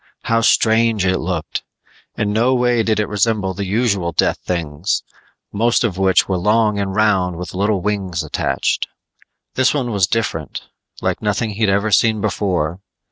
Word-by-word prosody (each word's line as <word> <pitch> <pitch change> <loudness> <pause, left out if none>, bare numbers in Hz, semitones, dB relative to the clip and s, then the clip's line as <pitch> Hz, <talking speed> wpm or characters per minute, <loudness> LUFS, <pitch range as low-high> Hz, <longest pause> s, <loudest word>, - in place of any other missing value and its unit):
How 115 0 +1
strange 110 -2 +3
it 95 0 +1
looked. - - -3 0.6
In 105 -1 0
no 120 +4 +2
way 125 -1 +2
did 110 -1 0
it 105 - 0
resemble 105 -2 0
the 100 +1 -4
usual 100 -4 0
death - - +1
things, 85 0 -2 0.5
most 115 +4 +2
of 95 -6 -1
which 95 -1 +3
were 95 -2 -1
long 105 +2 +2
and 95 -1 -2
round 95 -5 +2
with 90 +2 -7
little 100 +1 0
wings 95 -5 -2
attached. - - -1 0.7
This 130 +3 +2
one 125 -4 -1
was 100 -4 +2
different, 85 -10 -3 0.4
like - - -1
nothing 105 +1 -1
he'd 105 0 0
ever 100 +2 +1
seen 110 +2 +3
before. 95 -5 -1
105 Hz, 160 wpm, -19 LUFS, 95-110 Hz, 0.7 s, strange